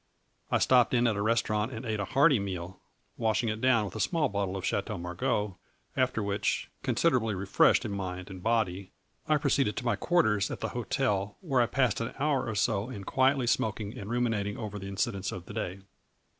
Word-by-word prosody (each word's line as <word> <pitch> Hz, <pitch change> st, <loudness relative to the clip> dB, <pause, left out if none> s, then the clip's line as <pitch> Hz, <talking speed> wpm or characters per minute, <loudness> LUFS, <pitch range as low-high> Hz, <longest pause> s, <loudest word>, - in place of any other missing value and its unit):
I -, -, +3 dB
stopped 125 Hz, -1 st, +4 dB
in 120 Hz, 0 st, +3 dB
at 115 Hz, -3 st, +2 dB
a 100 Hz, -, -1 dB
restaurant 110 Hz, +1 st, +1 dB
and 115 Hz, 0 st, -6 dB
ate 110 Hz, -2 st, -2 dB
a 100 Hz, -, -1 dB
hearty 140 Hz, 0 st, +4 dB
meal, 95 Hz, -2 st, -5 dB, 0.4 s
washing 115 Hz, 0 st, +1 dB
it 110 Hz, +1 st, -3 dB
down 120 Hz, -4 st, +4 dB
with 95 Hz, -, -7 dB
a -, -, -4 dB
small 160 Hz, +3 st, +1 dB
bottle 100 Hz, -2 st, -2 dB
of 95 Hz, -, -4 dB
Chateau 100 Hz, +1 st, -1 dB
Margaux, 95 Hz, +2 st, -2 dB, 0.4 s
after 130 Hz, -4 st, +1 dB
which, 100 Hz, 0 st, -1 dB
considerably 115 Hz, -5 st, +1 dB
refreshed 95 Hz, +1 st, +3 dB
in -, -, -3 dB
mind 95 Hz, -1 st, -5 dB
and 95 Hz, -1 st, -8 dB
body, 100 Hz, -4 st, 0 dB, 0.3 s
I 155 Hz, -1 st, +4 dB
proceeded 140 Hz, -6 st, +1 dB
to -, -, -3 dB
my 120 Hz, -3 st, +2 dB
quarters 105 Hz, -, +2 dB
at -, -, -5 dB
the -, -, -1 dB
hotel, 100 Hz, 0 st, -1 dB
where 135 Hz, -8 st, +2 dB
I 120 Hz, -, +3 dB
passed 125 Hz, 0 st, +1 dB
an 115 Hz, -, -4 dB
hour 140 Hz, -2 st, +1 dB
or 110 Hz, -, -3 dB
so 105 Hz, +1 st, 0 dB
in 100 Hz, -6 st, -7 dB
quietly 130 Hz, +3 st, +2 dB
smoking 110 Hz, -1 st, -1 dB
and 105 Hz, -5 st, -7 dB
ruminating 115 Hz, -4 st, 0 dB
over 105 Hz, -2 st, -5 dB
the 95 Hz, -, -7 dB
incidents 100 Hz, 0 st, -2 dB
of 90 Hz, -, -7 dB
the -, -, -9 dB
day. 95 Hz, -3 st, -4 dB
110 Hz, 200 wpm, -29 LUFS, 100-125 Hz, 0.4 s, stopped